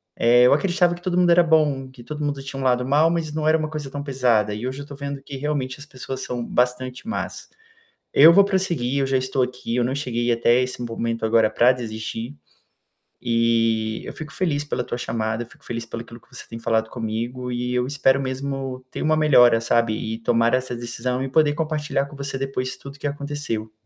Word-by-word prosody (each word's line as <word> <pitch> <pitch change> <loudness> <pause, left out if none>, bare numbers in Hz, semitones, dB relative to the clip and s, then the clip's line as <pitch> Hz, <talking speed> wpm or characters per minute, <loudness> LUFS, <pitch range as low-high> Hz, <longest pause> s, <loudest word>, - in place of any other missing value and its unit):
eh, 120 +1 +5
eu 125 - +6
acreditava 175 +1 +2
que 175 - -14
todo 180 -1 -1
mundo 180 -1 +4
era 175 0 +6
bom, 150 -5 +2
que 125 -2 -14
todo 150 +1 -5
mundo 145 -1 -2
tinha 135 0 -7
um - - -3
lado 125 -1 +2
mal, 150 +4 +4
mas 165 -3 -2
não 155 0 -2
era 160 +1 +5
uma 155 -1 -3
coisa 150 -3 -6
tão 145 0 -4
pesada. 120 -7 +1
E 105 +4 -5
hoje 130 +1 -5
eu - - -5
estou 140 0 -10
vendo 140 0 -5
que 140 0 -9
realmente 135 -2 -2
as 145 - -9
pessoas 130 -1 -7
são 120 -1 -4
bastante 125 - -1
más. 225 - -4 0.6
Eu 160 +4 +8
vou 200 - +7
prosseguir, 170 -10 0
eu 135 - +1
já 135 - +1
estou 130 0 0
aqui, 125 -2 -3
eu 125 - +2
não 130 - -1
cheguei 120 -4 -1
até 120 +1 +3
esse 125 -1 -4
momento 115 -1 -3
agora 110 -1 +4
para 120 +3 +5
desistir. 115 +1 -6 0.9
E 115 -2 +1
eu - - -7
fico 155 -1 -9
feliz 145 -3 0
pela 145 - -2
tua - - -4
chamada, 110 -1 -2
fico 120 - -20
feliz 115 -1 -5
pelo 115 0 -6
aquilo 115 0 -12
que - - -28
você - - -9
tem 115 - -7
falado 110 -1 0
comigo 120 +2 -4
e 125 0 -2
eu 125 0 +1
espero 135 -1 +2
mesmo 135 -1 -4
ter - - -5
uma 155 0 +3
melhora, 125 -7 +5
sabe. 115 -1 +2
E 110 0 -4
tomar 115 0 +2
essa 130 -1 -2
decisão 120 +2 -3
e 135 - -3
poder 150 +1 +3
compartilhar 150 -3 -1
com 145 - -12
você 140 -1 -4
depois 130 -1 -3
tudo 140 0 -11
que - - -8
aconteceu. 140 -6 -4
130 Hz, 220 wpm, -23 LUFS, 120-145 Hz, 0.9 s, Eu